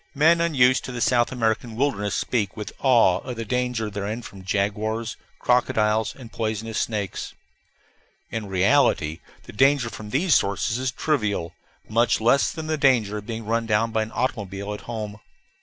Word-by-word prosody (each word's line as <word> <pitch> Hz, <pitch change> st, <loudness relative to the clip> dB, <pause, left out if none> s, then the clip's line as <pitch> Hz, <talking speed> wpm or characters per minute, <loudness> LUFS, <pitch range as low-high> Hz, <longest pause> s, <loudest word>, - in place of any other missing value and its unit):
Men 165 Hz, +4 st, +4 dB
unused 130 Hz, -6 st, +3 dB
to -, -, -5 dB
the 125 Hz, -, -5 dB
South 120 Hz, 0 st, +2 dB
American 115 Hz, -2 st, -1 dB
wilderness 110 Hz, -6 st, 0 dB
speak 105 Hz, -6 st, -1 dB
with 105 Hz, -, -6 dB
awe 120 Hz, -9 st, +4 dB
of 125 Hz, -2 st, -6 dB
the 115 Hz, 0 st, -5 dB
danger 125 Hz, -1 st, -1 dB
therein 105 Hz, +3 st, -4 dB
from 100 Hz, -3 st, -11 dB
jaguars, 105 Hz, +4 st, -1 dB, 0.2 s
crocodiles, 110 Hz, -3 st, +1 dB
and 120 Hz, -4 st, -12 dB
poisonous 110 Hz, 0 st, -2 dB
snakes. 105 Hz, -4 st, -3 dB, 1.0 s
In 110 Hz, -2 st, -4 dB
reality, 95 Hz, -, +2 dB, 0.2 s
the -, -, -12 dB
danger 135 Hz, 0 st, +3 dB
from 105 Hz, +1 st, -8 dB
these 155 Hz, -, +2 dB
sources 100 Hz, +4 st, +1 dB
is 130 Hz, 0 st, 0 dB
trivial, 105 Hz, -, -1 dB, 0.3 s
much 115 Hz, +2 st, +2 dB
less 120 Hz, +5 st, +3 dB
than 160 Hz, -2 st, -6 dB
the 155 Hz, -1 st, -2 dB
danger 115 Hz, -7 st, +3 dB
of 105 Hz, -, -13 dB
being 115 Hz, -1 st, -5 dB
run 115 Hz, +1 st, 0 dB
down 115 Hz, +1 st, +2 dB
by 110 Hz, 0 st, +1 dB
an 110 Hz, +1 st, -4 dB
automobile 100 Hz, -5 st, -3 dB
at 105 Hz, -, -7 dB
home. 105 Hz, -3 st, -5 dB
115 Hz, 165 wpm, -24 LUFS, 105-125 Hz, 1.0 s, Men